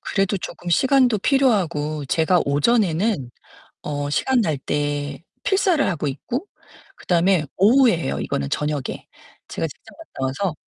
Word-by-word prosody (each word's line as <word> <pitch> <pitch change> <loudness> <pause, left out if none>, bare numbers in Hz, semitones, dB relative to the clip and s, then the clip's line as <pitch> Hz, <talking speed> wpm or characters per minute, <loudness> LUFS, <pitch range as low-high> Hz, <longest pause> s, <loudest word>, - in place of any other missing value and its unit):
그래도 195 0 0
조끔 175 -1 -7
시간도 255 - +3
필요하고 175 - +1
제가 165 +5 +2
오전에는 165 - +1 0.5
어 145 -1 -3
시간 255 - +1
날 160 -9 0
때 145 +1 -3 0.2
필사를 375 -6 +2
하고 155 -5 -1
있고 245 - -4 0.5
그 - - -17
다음에 175 -1 +3
오후에 230 +2 +5
해요, 70 - -3
이거는 70 - -2
저녁에. 150 -3 -3 0.4
제가 - - -2
직장 - - -16
갔다 325 - -7 0.2
와서 175 - -1
175 Hz, 300 characters per minute, -22 LUFS, 145-230 Hz, 0.5 s, 오후에